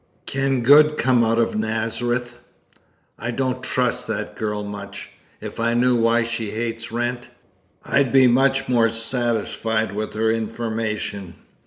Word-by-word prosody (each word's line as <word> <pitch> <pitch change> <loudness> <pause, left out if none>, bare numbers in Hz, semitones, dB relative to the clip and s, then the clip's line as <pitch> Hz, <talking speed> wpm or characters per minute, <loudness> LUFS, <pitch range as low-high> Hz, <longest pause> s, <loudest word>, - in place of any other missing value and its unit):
Can 135 -1 0
good 150 +4 +6
come 125 -2 +3
out 115 0 +1
of 115 - +1
Nazareth? 115 +3 -1 0.9
I 120 - -4
don't 130 +1 -2
trust 125 -1 -1
that - - -4
girl 105 -2 -3
much. 100 -1 -8 0.3
If - - -8
I 115 +1 +1
knew 125 +1 +3
why 115 0 +3
she 115 -2 -3
hates 115 +1 -4
Wrent, 120 +1 -2 0.6
I'd 140 -3 +2
be 135 -1 +6
much 135 +2 +3
more 115 -2 +3
satisfied 115 -2 -1
with 105 +2 -4
her 110 +1 +2
information. 110 -4 -3
115 Hz, 140 wpm, -22 LUFS, 110-125 Hz, 0.9 s, good